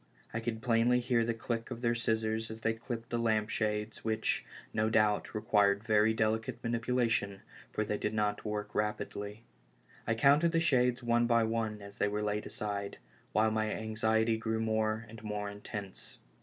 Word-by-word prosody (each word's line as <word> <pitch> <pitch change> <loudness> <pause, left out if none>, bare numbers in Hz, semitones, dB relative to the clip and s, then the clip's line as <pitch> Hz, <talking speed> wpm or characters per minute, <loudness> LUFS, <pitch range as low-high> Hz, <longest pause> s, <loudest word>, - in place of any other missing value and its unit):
I 115 - -1
could 115 0 -4
plainly 120 0 +4
hear 120 -1 +2
the 115 0 -1
click 115 0 -3
of 120 -2 -6
their 120 -1 +2
scissors 110 -1 0
as 110 0 -8
they 115 0 +1
clipped 115 0 -6
the 120 - 0
lampshades, 110 -1 0
which, 110 0 0 0.3
no 110 0 +2
doubt, 105 0 +2
required 100 -1 +3
very 110 -1 +4
delicate 110 +2 0
manipulation, 115 -4 0 0.3
for 110 - -1
they 105 0 -2
did. 105 +1 -1
not 105 -1 0
work 105 -1 -3
rapidly. 105 0 -3 0.6
I 115 - +2
counted 145 +8 +4
the 165 - +4
shades 125 -5 +2
one 120 0 +3
by 115 -1 +4
one 110 -2 -1
as 100 0 -11
they - - +3
were 105 +1 -1
laid 105 0 -1
aside, 105 -4 -4 0.3
while 110 +1 +3
my 110 0 0
anxiety 110 +1 +1
grew 110 0 -1
more 110 0 0
and 110 0 -11
more 105 -1 -3
intense. 100 -1 -8
110 Hz, 170 wpm, -32 LUFS, 105-115 Hz, 0.6 s, plainly